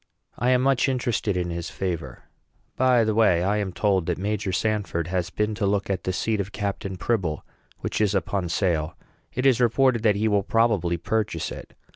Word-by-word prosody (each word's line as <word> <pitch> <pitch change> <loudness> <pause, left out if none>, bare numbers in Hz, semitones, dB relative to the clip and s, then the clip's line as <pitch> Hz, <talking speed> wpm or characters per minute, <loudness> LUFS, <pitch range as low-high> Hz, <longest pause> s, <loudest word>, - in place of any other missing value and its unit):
I 120 - 0
am 125 0 +3
much 135 0 +3
interested 120 -6 -1
in 90 -1 -2
his 85 0 -4
favor. 85 -9 -4 0.5
By 125 -2 +4
the 110 0 +1
way, 105 -6 +3
I 100 +3 +1
am 100 -3 -2
told 95 -2 +1
that 90 - 0
Major 100 +1 -2
Sanford 100 -4 -1
has 90 -1 -1
been 105 +3 -1
to 105 -1 -1
look 100 0 0
at 95 - -3
the 95 - 0
seat 110 +3 -1
of 100 +1 -6
Captain 100 -2 -4
Pribble, 90 -9 -1 0.4
which - - -2
is 105 -1 +2
upon 95 -2 -1
sale. 80 -3 0 0.3
It 130 - -2
is 130 -2 +4
reported 120 0 +3
that 105 -3 +3
he 105 +2 +1
will 105 -2 +3
probably 100 -6 +1
purchase 105 -1 -2
it. - - -9
100 Hz, 195 wpm, -25 LUFS, 90-110 Hz, 0.5 s, By